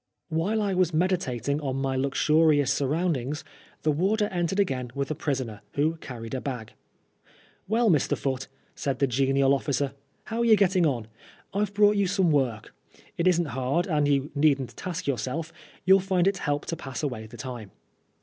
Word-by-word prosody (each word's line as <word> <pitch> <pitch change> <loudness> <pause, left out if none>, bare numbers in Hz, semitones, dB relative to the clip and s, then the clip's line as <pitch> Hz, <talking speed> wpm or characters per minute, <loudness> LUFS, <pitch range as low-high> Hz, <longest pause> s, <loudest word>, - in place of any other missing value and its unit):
While 190 +7 0
I 200 -1 0
was 180 -3 +1
meditating 150 - 0
on 135 -3 -2
my 135 0 -1
luxurious 145 +1 +3
surround 155 +5 +1
ings, 135 +5 -4 0.4
the 155 - +3
warder 205 +7 +1
entered 175 +2 -1
again 130 -10 0
with 140 +1 -2
a - - +2
prisoner, 130 -8 -3
who 155 +3 +1
carried 120 -6 -8
a 130 - -2
bag. 125 -6 -5 0.9
"Well, 225 +3 +2
Mr. 150 - +2
Foote," 135 -1 -2 0.3
said 135 -3 -2
the 140 - +3
genial 135 +1 +2
officer, 140 0 -1 0.2
" - - -41
how 225 +2 -4
are 235 - +2
you 225 -2 +7
getting 185 -4 +3
on? 120 -6 -1 0.5
I've 205 0 -1
brought 205 0 +5
you 200 -1 +2
some 190 -3 +2
work. 125 -7 0 0.4
It 170 - +1
isn't 175 -2 +3
hard, 135 +7 0
and 150 -5 +1
you 140 0 +1
needn't 140 -3 +2
task 180 -1 -5
your 140 -5 0
self; 160 +9 -4 0.3
you'll 190 +1 +7
find 185 -1 +1
it 195 -2 +1
help 145 -1 -1
to 165 - -3
pass 135 0 -6
away 120 -6 -3
the - - -12
time." 120 -6 -7
150 Hz, 185 wpm, -26 LUFS, 135-180 Hz, 0.9 s, you